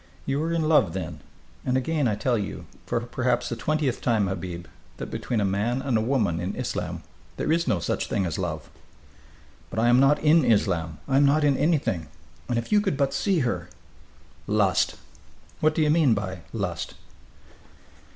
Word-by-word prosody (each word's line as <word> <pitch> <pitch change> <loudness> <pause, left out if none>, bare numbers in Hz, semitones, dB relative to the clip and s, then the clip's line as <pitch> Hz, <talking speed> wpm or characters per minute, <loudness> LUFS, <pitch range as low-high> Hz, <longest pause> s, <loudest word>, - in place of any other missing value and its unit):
"You 140 +2 0
are 165 +1 -1
in 165 -2 +1
love, 150 - +4
then... 85 -4 -5 0.4
and 130 0 +1
again 145 +1 0
I 105 - +1
tell, 120 +4 0
you, 105 -3 -4 0.2
for - - 0
perhaps 120 +1 -1
the 120 - -2
twentieth 145 +1 -1
time, 110 -4 +2
Habib, 90 -2 -4 0.3
that - - -6
between 120 - -2
a 100 - +1
man 105 +6 0
and 135 -4 0
a 110 - +3
woman 110 -9 +1
in 90 +3 -3
Islam 90 -9 -3 0.3
there - - -1
is 170 -1 +2
no 110 -7 +2
such 85 - -2
thing 95 - 0
as 85 -1 -3
love." 80 -4 -4 1.0
"But - - -8
I 115 +2 +3
am 120 +1 +6
not 135 +2 +5
in 155 +1 +4
Islam. 90 -9 +1
I 135 -1 +2
am 140 - +5
not 150 +2 +3
in 145 -2 +4
anything! 130 - +1 0.4
And 120 - +1
if 115 - -3
you 210 -1 +5
could 195 -9 -1
but 140 -1 +1
see 190 -6 +1
her 90 -9 -2 0.4
" - - -29 0.2
"Lust!" - - +2 0.6
"What 155 0 +2
do 160 - +2
you 150 - +3
mean 150 -8 +4
by 95 -2 -4
'lust'?" - - -3
120 Hz, 190 wpm, -25 LUFS, 95-145 Hz, 1.0 s, am